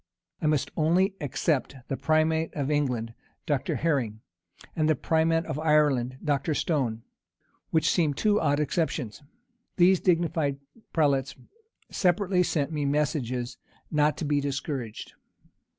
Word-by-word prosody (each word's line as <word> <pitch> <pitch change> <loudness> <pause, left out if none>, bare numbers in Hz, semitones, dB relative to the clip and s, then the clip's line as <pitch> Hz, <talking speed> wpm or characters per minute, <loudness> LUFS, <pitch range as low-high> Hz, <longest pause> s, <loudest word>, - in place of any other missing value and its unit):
I 155 - +1
must 150 -3 +1
only 175 +5 +2
except 145 0 -1
the 135 - -2
primate 160 +2 +1
of 145 -1 -1
England, 125 -6 -1 0.3
Dr. 145 -4 -1
Herring, 125 -10 -1 0.5
and 155 -1 +1
the 155 - +4
primate 165 +1 +1
of 155 -2 -4
Ireland, 145 -5 +2
Dr. 145 +1 0
Stone, 125 -9 -1 0.7
which 160 -1 +2
seem 155 -5 +1
two 210 +4 +2
odd 145 -2 +2
exceptions. 150 -5 -2 0.5
These 185 0 +5
dignified 165 -5 +1 0.3
prelates 140 -4 +1 0.6
separately 185 0 +2
sent 155 -4 0
me 150 -2 -2
messages 140 -4 -1 0.3
not 150 0 +2
to 160 - -3
be 145 -1 +1
discouraged. 140 -5 -4
150 Hz, 125 wpm, -27 LUFS, 140-160 Hz, 0.7 s, These